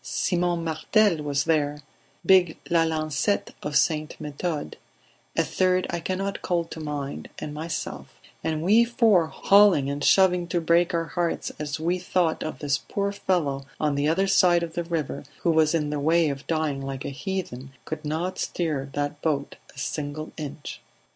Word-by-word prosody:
Simon 175 Hz, -2 st, 0 dB
Martel 170 Hz, +4 st, +2 dB
was 145 Hz, -1 st, 0 dB
there, 150 Hz, -2 st, 0 dB, 0.4 s
big 180 Hz, -4 st, +5 dB
Lalancette 160 Hz, +2 st, +1 dB
of 150 Hz, 0 st, -4 dB
St. 155 Hz, -1 st, +1 dB
Methode, 150 Hz, +1 st, -4 dB, 0.6 s
a -, -, +4 dB
third 185 Hz, 0 st, +1 dB
I 170 Hz, -, -2 dB
cannot 190 Hz, +3 st, -3 dB
call 175 Hz, -1 st, 0 dB
to -, -, -7 dB
mind, 145 Hz, -2 st, -5 dB
and 145 Hz, -, -6 dB
myself; 160 Hz, +2 st, -5 dB, 0.4 s
and 160 Hz, -1 st, -1 dB
we 215 Hz, +6 st, +6 dB
four, 225 Hz, -8 st, +3 dB
hauling 195 Hz, -6 st, +4 dB
and 145 Hz, 0 st, -4 dB
shoving 180 Hz, -2 st, +4 dB
to 175 Hz, +1 st, 0 dB
break 170 Hz, +1 st, +2 dB
our 165 Hz, 0 st, 0 dB
hearts 170 Hz, 0 st, -2 dB
as 150 Hz, 0 st, -3 dB
we 175 Hz, +3 st, 0 dB
thought 180 Hz, -2 st, 0 dB
of 155 Hz, -, -4 dB
this 140 Hz, -2 st, 0 dB
poor 200 Hz, +8 st, -2 dB
fellow 150 Hz, -9 st, -1 dB
on 150 Hz, -1 st, +1 dB
the 140 Hz, +1 st, +1 dB
other 180 Hz, +5 st, +2 dB
side 180 Hz, -3 st, +4 dB
of 165 Hz, -1 st, -5 dB
the 175 Hz, -, -2 dB
river 165 Hz, -5 st, -3 dB, 0.2 s
who 170 Hz, -, +3 dB
was 160 Hz, 0 st, +3 dB
in 150 Hz, -2 st, 0 dB
the 150 Hz, -, -1 dB
way 160 Hz, +2 st, +3 dB
of 140 Hz, 0 st, -6 dB
dying 155 Hz, -4 st, -1 dB
like 135 Hz, -1 st, -5 dB
a -, -, -2 dB
heathen, 140 Hz, -4 st, -5 dB
could 155 Hz, 0 st, -5 dB
not 160 Hz, +5 st, -2 dB
stir 150 Hz, -6 st, -2 dB
that 145 Hz, +1 st, -3 dB
boat 145 Hz, -3 st, -1 dB, 0.2 s
a -, -, -22 dB
single 150 Hz, +2 st, -4 dB
inch. 150 Hz, -1 st, -7 dB
160 Hz, 170 wpm, -25 LUFS, 145-175 Hz, 0.6 s, we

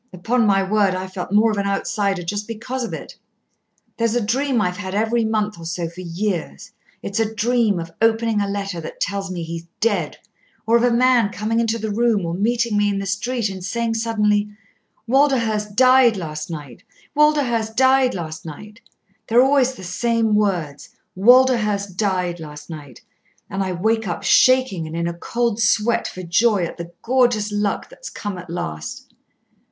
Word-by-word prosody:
Upon 225 Hz, +6 st, 0 dB
my 195 Hz, -1 st, +3 dB
word, 195 Hz, -1 st, +2 dB
I've 185 Hz, 0 st, -6 dB
felt 180 Hz, 0 st, -5 dB
more 215 Hz, +2 st, +4 dB
of 210 Hz, -, -3 dB
an 200 Hz, -, -1 dB
outsider 200 Hz, -1 st, -1 dB
just 205 Hz, +4 st, -4 dB
because 240 Hz, +3 st, -4 dB
of 235 Hz, -, -4 dB
it. -, -, -8 dB, 0.8 s
There's 230 Hz, 0 st, 0 dB
a 240 Hz, -3 st, 0 dB
dream 260 Hz, +3 st, +1 dB
I've 180 Hz, -3 st, -1 dB
had 190 Hz, -1 st, -5 dB
every 225 Hz, +2 st, +1 dB
month 215 Hz, -3 st, -1 dB
or 165 Hz, -, -9 dB
so 170 Hz, 0 st, -3 dB
for 170 Hz, +2 st, -10 dB
years. 175 Hz, -, -4 dB, 0.3 s
It's 200 Hz, +2 st, -3 dB
a 220 Hz, -1 st, 0 dB
dream 225 Hz, -3 st, +1 dB
of 165 Hz, 0 st, -6 dB
opening 225 Hz, -1 st, +2 dB
a 200 Hz, -, -1 dB
letter 195 Hz, -3 st, -3 dB
that 155 Hz, -, -9 dB
tells 200 Hz, -1 st, -2 dB
me 175 Hz, -2 st, -4 dB
he's 165 Hz, +1 st, -7 dB
dead, 200 Hz, -9 st, 0 dB, 0.5 s
or 230 Hz, -, +3 dB
of 235 Hz, -, +4 dB
a 245 Hz, -, +4 dB
man 240 Hz, -2 st, +3 dB
coming 215 Hz, +3 st, -1 dB
into 230 Hz, -1 st, 0 dB
the 220 Hz, -1 st, -3 dB
room 220 Hz, -3 st, +1 dB
or 165 Hz, -, -3 dB
meeting 230 Hz, +4 st, 0 dB
me 205 Hz, 0 st, +2 dB
in 200 Hz, -, -1 dB
the 195 Hz, -, -3 dB
street 215 Hz, +4 st, -1 dB
and 190 Hz, -2 st, -7 dB
saying 230 Hz, +4 st, -1 dB
suddenly, 210 Hz, -2 st, +1 dB, 0.6 s
'Walderhurst 230 Hz, -6 st, +1 dB
died 255 Hz, -2 st, +5 dB
last 155 Hz, -3 st, -5 dB
night, 145 Hz, -4 st, -8 dB, 0.3 s
Walderhurst 260 Hz, -7 st, +2 dB
died 260 Hz, -1 st, +4 dB
last 160 Hz, -3 st, -6 dB
night!' 210 Hz, -, -10 dB, 0.5 s
They're 240 Hz, +3 st, +5 dB
always 265 Hz, -1 st, +3 dB
the 190 Hz, -, -11 dB
same 225 Hz, +4 st, 0 dB
words, 180 Hz, -9 st, -1 dB, 0.3 s
'Walderhurst 210 Hz, -3 st, +4 dB
died 180 Hz, -4 st, -1 dB
last 150 Hz, 0 st, -10 dB
night!' 145 Hz, -6 st, -10 dB, 0.5 s
And 195 Hz, -, -2 dB
I 190 Hz, -1 st, -1 dB
wake 220 Hz, +4 st, 0 dB
up 175 Hz, -, -4 dB
shaking 255 Hz, -10 st, +3 dB
and 160 Hz, -, -7 dB
in 170 Hz, 0 st, -1 dB
a 170 Hz, -, -2 dB
cold 230 Hz, +5 st, -2 dB
sweat 220 Hz, +2 st, +2 dB
for 185 Hz, -, -8 dB
joy 195 Hz, +3 st, +2 dB
at -, -, -7 dB
the 170 Hz, 0 st, -7 dB
gorgeous 240 Hz, -4 st, +2 dB
luck 205 Hz, 0 st, -1 dB
that's -, -, -10 dB
come 205 Hz, -3 st, -6 dB
at 175 Hz, -1 st, -11 dB
last." 80 Hz, -, -6 dB
210 Hz, 180 wpm, -21 LUFS, 180-230 Hz, 0.8 s, died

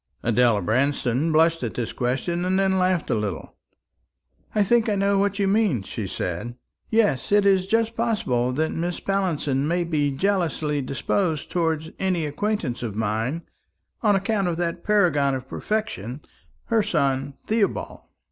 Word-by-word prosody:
Adela 115 Hz, -3 st, +3 dB
Branston 130 Hz, -, +1 dB
blushed 165 Hz, +1 st, +3 dB
at 120 Hz, -3 st, -3 dB
this 120 Hz, -2 st, -3 dB
question, 135 Hz, +8 st, -1 dB
and 185 Hz, +1 st, +1 dB
then 190 Hz, -1 st, +2 dB
laughed 185 Hz, -2 st, +1 dB
a -, -, +3 dB
little. 105 Hz, -6 st, -3 dB, 1.0 s
"I 210 Hz, -, +4 dB
think 230 Hz, +2 st, +3 dB
I 210 Hz, -, +1 dB
know 200 Hz, 0 st, +2 dB
what 200 Hz, 0 st, +1 dB
you 200 Hz, -2 st, +1 dB
mean," 195 Hz, -, +2 dB
she 100 Hz, +1 st, -5 dB
said. 90 Hz, +7 st, -4 dB, 0.3 s
"Yes, 210 Hz, -, +1 dB
it 205 Hz, 0 st, +4 dB
is 190 Hz, -2 st, +3 dB
just 225 Hz, +2 st, +1 dB
possible 165 Hz, -, 0 dB
that 155 Hz, +4 st, 0 dB
Mrs. 175 Hz, +1 st, -3 dB
Pallinson 155 Hz, -8 st, 0 dB
may 175 Hz, +2 st, +1 dB
be 150 Hz, -4 st, 0 dB
jealously 160 Hz, -3 st, 0 dB
disposed 155 Hz, +5 st, -1 dB
towards 160 Hz, -2 st, -1 dB
any 185 Hz, -4 st, 0 dB
acquaintance 150 Hz, -, -2 dB
of 115 Hz, -4 st, -4 dB
mine, 110 Hz, +9 st, -1 dB, 0.6 s
on 210 Hz, -3 st, +4 dB
account 200 Hz, 0 st, 0 dB
of 170 Hz, -2 st, -1 dB
that 170 Hz, 0 st, -2 dB
paragon 160 Hz, -10 st, +3 dB
of 130 Hz, 0 st, -6 dB
perfection, 150 Hz, -, -3 dB, 0.5 s
her 225 Hz, -, +5 dB
son 135 Hz, -6 st, 0 dB
Theobald. 215 Hz, -2 st, -1 dB
165 Hz, 155 wpm, -24 LUFS, 130-195 Hz, 1.0 s, her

